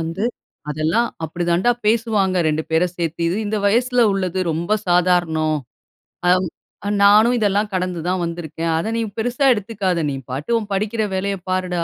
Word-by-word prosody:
வந்து, 165 Hz, +6 st, -3 dB, 0.5 s
"அதெல்லாம் 160 Hz, +11 st, +1 dB, 0.2 s
அப்டி 170 Hz, +2 st, -3 dB
தான்டா 180 Hz, +8 st, +3 dB, 0.2 s
பேசுவாங்க. 215 Hz, -4 st, +2 dB
2 155 Hz, +1 st, 0 dB
பேரை 165 Hz, +3 st, +3 dB
சேர்த்து. 170 Hz, -1 st, -3 dB
இது 180 Hz, -, -1 dB
இந்த 215 Hz, +1 st, -1 dB
வயசுல 245 Hz, +3 st, +3 dB
உள்ளது, 190 Hz, -1 st, -2 dB
ரொம்ப 170 Hz, +7 st, 0 dB
சாதாரணம். 175 Hz, -3 st, +2 dB, 0.7 s
அ, -, -, +5 dB, 0.7 s
நானும் 215 Hz, +4 st, +6 dB
இதெல்லாம் 205 Hz, 0 st, +1 dB
கடந்துதான் 180 Hz, 0 st, -1 dB
வந்திருக்கேன். 165 Hz, -1 st, -4 dB
அத, 165 Hz, -, -2 dB
நீ -, -, 0 dB, 0.2 s
பெருசா 245 Hz, +5 st, 0 dB
எடுத்துக்காத 200 Hz, -5 st, -2 dB
நீ 135 Hz, -, -3 dB, 0.2 s
பாட்டு, 140 Hz, -, -4 dB
உன் 210 Hz, -2 st, -8 dB
படிக்கிற 215 Hz, +3 st, -1 dB
வேலையை 195 Hz, +1 st, -1 dB
பாருடா. 180 Hz, -2 st, -1 dB
185 Hz, 145 wpm, -20 LUFS, 170-215 Hz, 0.7 s, நானும்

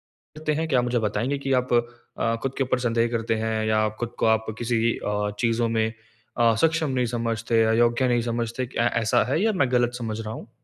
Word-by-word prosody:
करते 155 Hz, 0 st, -5 dB
हैं। 160 Hz, +2 st, -1 dB
क्या 130 Hz, -5 st, +3 dB
आप 120 Hz, -, 0 dB
मुझे 120 Hz, -1 st, 0 dB
बताएँगे 115 Hz, +7 st, -1 dB
कि 135 Hz, -, 0 dB
आप 125 Hz, -, -4 dB
अ, 120 Hz, -1 st, -1 dB
खुद 135 Hz, -, -2 dB
के 135 Hz, -, +2 dB
ऊपर 130 Hz, -1 st, 0 dB
संदेह 115 Hz, -1 st, +1 dB
करते 115 Hz, -1 st, 0 dB
हैं 110 Hz, -1 st, -1 dB
या 110 Hz, -, +2 dB
आप 110 Hz, 0 st, 0 dB
खुद 120 Hz, 0 st, -3 dB
को -, -, +2 dB
आप 110 Hz, 0 st, +3 dB
किसी 115 Hz, -1 st, +1 dB
अ, 105 Hz, 0 st, -2 dB
चीज़ों 115 Hz, 0 st, +1 dB
में 110 Hz, 0 st, 0 dB, 0.4 s
अ, 115 Hz, -1 st, +4 dB
सक्षम 165 Hz, -1 st, +2 dB
नहीं 125 Hz, -, +2 dB
समझते, 115 Hz, 0 st, +1 dB
अयोग्य 120 Hz, +3 st, +3 dB
नहीं 120 Hz, -1 st, +2 dB
समझते, 120 Hz, +1 st, -3 dB
ऐ 120 Hz, -, +4 dB
ऐसा 110 Hz, -, +3 dB
है 160 Hz, -, +1 dB
या 220 Hz, -, +3 dB
मैं 140 Hz, -9 st, +1 dB
गलत 120 Hz, -1 st, +2 dB
समझ 110 Hz, -2 st, -4 dB
रहा 110 Hz, 0 st, -5 dB
हूँ? 115 Hz, -, -9 dB
120 Hz, 225 wpm, -24 LUFS, 115-125 Hz, 0.4 s, अ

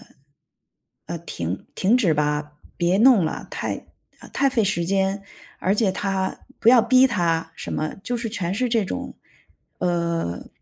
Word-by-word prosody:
止 -, -, -20 dB, 2.0 s
吧， 150 Hz, 0 st, -1 dB, 0.2 s
别 175 Hz, +2 st, +2 dB
弄 230 Hz, -7 st, +6 dB
了， 155 Hz, -, -4 dB
太 -, -, -4 dB, 0.5 s
太 275 Hz, -, +2 dB
费 225 Hz, -5 st, +2 dB
时 170 Hz, -3 st, 0 dB
间， 195 Hz, +2 st, 0 dB, 0.4 s
而 190 Hz, -, +2 dB
且 205 Hz, -2 st, +2 dB
他 195 Hz, -1 st, -2 dB, 0.2 s
不 230 Hz, -, +3 dB
要 240 Hz, -2 st, +8 dB
逼 255 Hz, +2 st, +5 dB
他” 165 Hz, -7 st, 0 dB
什 -, -, -6 dB
么。 155 Hz, 0 st, -2 dB
就 245 Hz, -, -2 dB
是 230 Hz, -1 st, -3 dB
全 185 Hz, -5 st, -2 dB
是 245 Hz, +5 st, 0 dB
这 225 Hz, -3 st, +1 dB
种， -, -, -5 dB, 0.6 s
呃， 170 Hz, -, -1 dB
190 Hz, 145 characters per minute, -23 LUFS, 170-230 Hz, 2.0 s, 要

